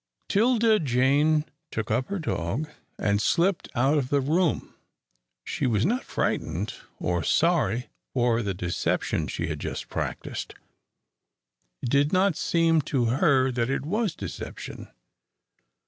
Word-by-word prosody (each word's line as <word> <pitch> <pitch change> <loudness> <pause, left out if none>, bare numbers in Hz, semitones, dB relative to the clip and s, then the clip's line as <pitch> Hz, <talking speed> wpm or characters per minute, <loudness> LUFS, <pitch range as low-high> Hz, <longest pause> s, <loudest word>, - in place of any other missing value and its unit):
'Tilda 225 0 +4
Jane 145 +3 +3 0.2
took 110 -1 -3
up 125 +4 +1
her 200 - -2
dog, 140 - -2 0.3
and 100 0 +1
slipped 175 - +1
out 135 +5 +3
of 130 -2 -3
the 145 - +3
room. 160 +5 0 0.7
She - - -1
was 110 -2 +2
not 245 +7 +1
frightened 85 +7 -2 0.3
or 85 0 0
sorry 135 - +2 0.2
for 120 -2 +2
the 100 -4 -2
deception 90 -1 -1
she - - -3
had - - -4
just - - -5
practised. - - -4 1.3
It - - -1
did 140 +1 +3
not 185 -1 +3
seem 165 -1 +2
to 130 -5 +2
her 135 -3 +3
that 120 -1 -1
it 135 +1 -1
was 205 +2 0
deception. - - -7
140 Hz, 130 wpm, -26 LUFS, 120-170 Hz, 1.3 s, Tilda